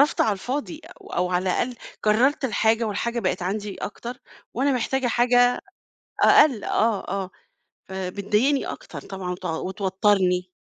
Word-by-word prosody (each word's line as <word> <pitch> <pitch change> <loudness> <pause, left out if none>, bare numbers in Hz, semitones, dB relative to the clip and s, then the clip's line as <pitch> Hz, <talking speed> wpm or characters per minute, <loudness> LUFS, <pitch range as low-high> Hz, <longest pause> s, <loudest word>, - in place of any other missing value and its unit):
صرفت 290 - +3
على 215 - +3
الفاضي 280 - -4 0.2
أو - - -15
أو 180 +1 0
على 180 0 +1
الأقل 245 +6 0 0.3
كرّرت 255 +8 +3
الحاجة 225 -1 +2
والحاجة 235 +3 -2
بقت 185 -2 -1
عندي 200 +2 -3
أكتر 240 +4 -6 0.4
وأنا 270 +3 +2
محتاجة 260 +1 0
حاجة 245 +1 +3 0.6
أقل، 265 -9 +5
آه، 220 -2 0
آه، 195 0 -3 0.6
فبتضايقني 205 +8 0
أكتر - - -7
طبعًا 190 -2 -6
وت 180 +1 -7
وتوتّرني. 190 +1 +1
210 Hz, 135 wpm, -24 LUFS, 190-245 Hz, 0.6 s, أقل